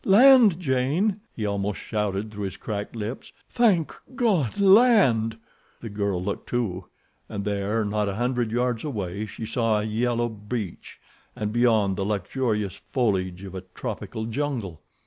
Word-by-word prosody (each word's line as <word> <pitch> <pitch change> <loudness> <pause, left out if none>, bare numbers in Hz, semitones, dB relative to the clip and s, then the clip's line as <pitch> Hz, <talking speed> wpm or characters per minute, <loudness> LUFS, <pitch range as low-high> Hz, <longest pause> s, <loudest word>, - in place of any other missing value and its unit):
"Land, 225 -3 +7
Jane!" 160 +8 +1
he 110 - -3
almost 100 0 -2
shouted 105 -1 -2
through 105 -1 -4
his 95 - -5
cracked 105 +1 -5
lips. 110 +3 -5 0.2
"Thank 205 -10 +3 0.2
God, 200 - +1
land!" 195 - +5 0.4
The 115 - -7
girl 100 -3 -1
looked, 100 +1 -4
too, 100 -7 -2 0.4
and 100 -2 -4
there, 105 +2 0
not 105 0 0
a 95 - -3
hundred 120 0 0
yards 120 -1 0
away, 105 - -3
she 110 +2 -7
saw 115 -1 +1
a - - -2
yellow 120 +2 0
beach, 105 -2 -6 0.4
and, 105 0 -3
beyond, 110 -5 +3
the 100 - -1
luxurious 105 0 -1
foliage 95 -7 -1
of 95 -2 -8
a 95 - -5
tropical 110 - -5
jungle. 115 - -3
110 Hz, 145 wpm, -25 LUFS, 100-130 Hz, 0.4 s, Land